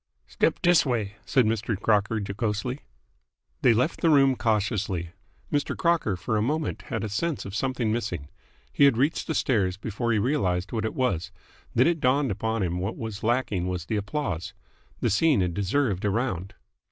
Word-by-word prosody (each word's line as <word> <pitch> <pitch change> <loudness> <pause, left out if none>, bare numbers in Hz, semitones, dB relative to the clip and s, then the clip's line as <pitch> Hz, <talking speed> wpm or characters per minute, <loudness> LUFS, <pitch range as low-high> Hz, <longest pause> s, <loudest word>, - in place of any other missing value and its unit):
"Step 65 -1 0
dis 175 -2 +5
way!" 115 -7 -1
said 130 -5 +3
Mr. 110 -1 -1
Crocker 105 +1 +2
jocosely. 105 +5 -2 0.8
They 125 - +6
left 125 +9 0
the 165 - +4
room 135 -3 +5
cautiously. 100 -7 -1 0.4
Mr. 145 -1 0
Crocker 170 - +1
for 110 +5 -1
a - - +1
moment 150 +7 -1
had 115 -4 -2
a - - -1
sense 150 +10 -2
of 100 - -7
something 125 0 -1
missing. 105 -11 -3 0.5
He 140 - +5
had 135 -5 +4
reached 145 +6 +1
the 160 - -1
stairs 100 -8 +1
before 115 +3 -2
he 110 - +2
realised 100 -7 0
what 110 -2 -1
it 110 - -3
was. 95 -10 0 0.4
Then 125 +2 +5
it 170 -1 +2
dawned 135 -1 +2
upon 110 +2 -1
him 90 -1 -1
that - - -3
what 95 +4 -3
was 110 -3 -5
lacking 110 -6 0
was 90 -2 -3
the 110 - -2
applause. 100 - -3 0.5
The - - +1
scene 140 +5 +3
had 90 -1 0
deserved 100 +1 0
a 105 - +2
round. 95 -4 -2
110 Hz, 185 wpm, -26 LUFS, 100-130 Hz, 0.8 s, They